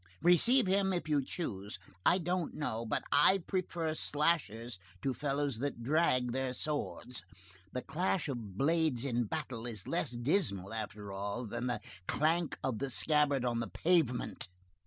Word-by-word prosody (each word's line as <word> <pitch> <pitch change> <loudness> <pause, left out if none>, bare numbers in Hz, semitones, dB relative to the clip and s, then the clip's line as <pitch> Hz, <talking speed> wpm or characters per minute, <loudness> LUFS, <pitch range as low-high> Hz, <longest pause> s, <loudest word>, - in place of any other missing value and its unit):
Receive 230 +9 +6
him 190 0 +2
if 175 -4 -2
you 145 -3 +2
choose. 105 - -4 0.3
I 175 - +5
don't 180 -1 -1
know 115 -6 -2
but - - 0
I 150 +7 +6
prefer 170 -4 -1
slashers 125 - 0 0.2
to 135 - +1
fellows 140 -3 -1
that 135 -3 -3
drag 125 -3 +2
their 130 0 -1
swords. 125 -4 -3 0.5
The 125 - -3
clash 175 +3 0
of 115 -8 -5
blades 155 -3 +2
in 120 -3 +1
battle 125 -4 -4
is 110 -5 -5
less - - 0
dismal, 120 - 0
after 105 -2 -5
all, 100 +5 -3
than 120 +3 -3
the 120 -4 -1 0.3
clank 165 +3 +1
of 125 -5 -1
the 140 - -2
scabbard 145 -1 +2
on 120 -1 0
the 115 - -3
pavement. 160 - +1
135 Hz, 155 wpm, -33 LUFS, 115-160 Hz, 0.5 s, Receive